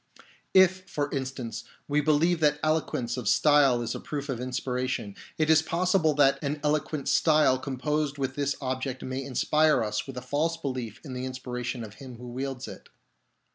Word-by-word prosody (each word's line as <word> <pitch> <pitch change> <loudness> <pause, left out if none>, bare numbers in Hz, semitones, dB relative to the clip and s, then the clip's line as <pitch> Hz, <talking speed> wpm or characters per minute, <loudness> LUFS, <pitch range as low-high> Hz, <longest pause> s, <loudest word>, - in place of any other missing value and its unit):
If, 185 0 +5
for 145 -1 -2
instance, 130 -4 -4 0.2
we 150 +1 +2
believe 155 +3 +3
that 150 -2 +3
eloquence 150 -6 0
of 125 - -4
style 135 -1 +4
is 115 - -3
a - - -5
proof 145 -1 -5
of 125 -3 -2
inspiration, 125 -4 -3 0.2
it 155 - +2
is 160 0 +6
possible 170 -1 +1
that 135 -1 +3
an 145 +1 -2
eloquent 150 -1 -1
style 150 -5 +4
composed 145 +2 -2
with 135 -1 -2
this 140 0 -1
object 130 0 -3
may 130 +1 -3
inspire 150 +2 +2
us 105 +3 -2
with 135 -2 -8
a - - -3
false 150 +6 0
belief 130 -7 -5
in 135 - -6
the 125 0 -4
inspiration 125 -1 -4
of 105 -2 -9
him 130 -2 -9
who 120 +1 -9
wields 130 +1 -4
it. - - -11
135 Hz, 175 wpm, -27 LUFS, 125-150 Hz, 0.2 s, is